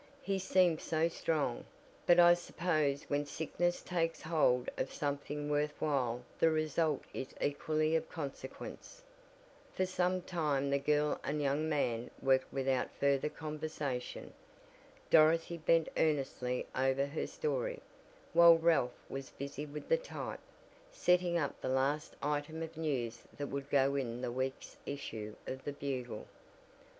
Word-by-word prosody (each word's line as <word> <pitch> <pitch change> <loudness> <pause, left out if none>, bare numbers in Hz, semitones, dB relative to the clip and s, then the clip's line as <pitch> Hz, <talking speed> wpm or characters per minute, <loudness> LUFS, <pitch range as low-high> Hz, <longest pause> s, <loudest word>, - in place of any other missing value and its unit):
"He 195 -1 0
seemed 180 -3 +3
so 160 +1 +1
strong, 155 -6 -1 0.4
but 175 0 +7
I 175 0 +9
suppose 155 -5 0
when 145 0 0
sickness 160 +4 -1
takes 165 -2 -1
hold 145 -6 +2
of 130 - -2
something 145 0 -3
worth 150 0 0
while 125 -5 0 0.2
the 165 - +5
result 155 -1 +1
is 130 - -6
equally 155 +2 +1
of 160 - 0
consequence." 150 - -7 0.7
For 185 - +2
some 185 0 0
time 145 -6 0
the 140 - +3
girl 150 +1 +1
and 150 +1 -1
young 145 +2 +1
man 120 -6 0
worked 130 -1 +2
without 135 -2 0
further 140 +1 +2
conversation. 150 -5 -4 0.8
Dorothy 165 +2 +5
bent 165 0 +3
earnestly 135 -5 0
over 135 +1 +2
her 140 +3 -3
story, - - -2 0.5
while 170 0 +9
Ralph 160 -7 +1
was 135 -1 -6
busy 140 +2 -6
with 150 +1 -7
the - - +4
type, - - -6 0.5
setting 180 - +2
up 145 -5 -2
the - - -2
last 135 +3 0
item 150 +2 -1
of 165 0 -7
news 130 -7 -2 0.2
that 145 -1 -3
would 140 0 -4
go 140 -1 +3
in 125 -3 -2
the 120 - -2
week's 130 +2 -4
issue 110 -7 -5
of 130 0 -5
the 145 - -3
Bugle. 130 -6 -4
150 Hz, 140 wpm, -34 LUFS, 135-165 Hz, 0.8 s, I